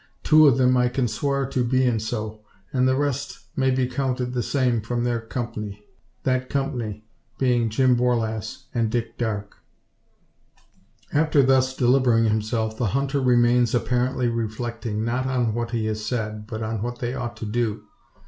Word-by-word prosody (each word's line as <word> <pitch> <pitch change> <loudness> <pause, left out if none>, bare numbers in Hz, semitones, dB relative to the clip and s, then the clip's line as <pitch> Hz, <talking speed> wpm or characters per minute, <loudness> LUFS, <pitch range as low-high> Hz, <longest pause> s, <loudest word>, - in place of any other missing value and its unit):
Two 155 -1 +7
o' - - +9
them 130 0 +3
I 125 0 +3
kin 125 0 0
swar 140 +5 -1
to 130 -2 0
bein' 125 -1 +2
so; 110 -1 -4 0.3
an' 130 -1 +3
the 130 - +3
rest 140 0 -2 0.2
may 130 -1 +2
be 130 0 +2
counted 125 -1 -2
the 125 - 0
same 125 -3 +1
from 120 +2 -2
their 120 -1 0
kumpny 105 -3 -5 0.4
that 130 0 0
kumpny 125 -7 -2 0.3
bein' 120 -3 +2
Jim 125 +3 +3
Borlasse 120 -1 -1
an' 115 -2 +1
Dick 115 0 -2
Darke." 105 -3 -3 1.6
After 150 -1 +4
thus 130 0 +3
delivering 125 -2 +4
himself, 110 0 0
the 120 - +1
hunter 140 0 0
remains 120 -1 +3
apparently 125 +1 0
reflecting, 115 -1 -3
not 125 +3 -1
on 125 -4 0
what 120 0 -2
he 115 -2 -1
has 110 0 -2
said, 110 -2 -3
but 110 -1 -3
what 120 +1 -3
they 120 0 -3
ought 120 -3 -5
to 110 - -5
do. 110 0 -1
120 Hz, 160 wpm, -24 LUFS, 110-130 Hz, 1.6 s, o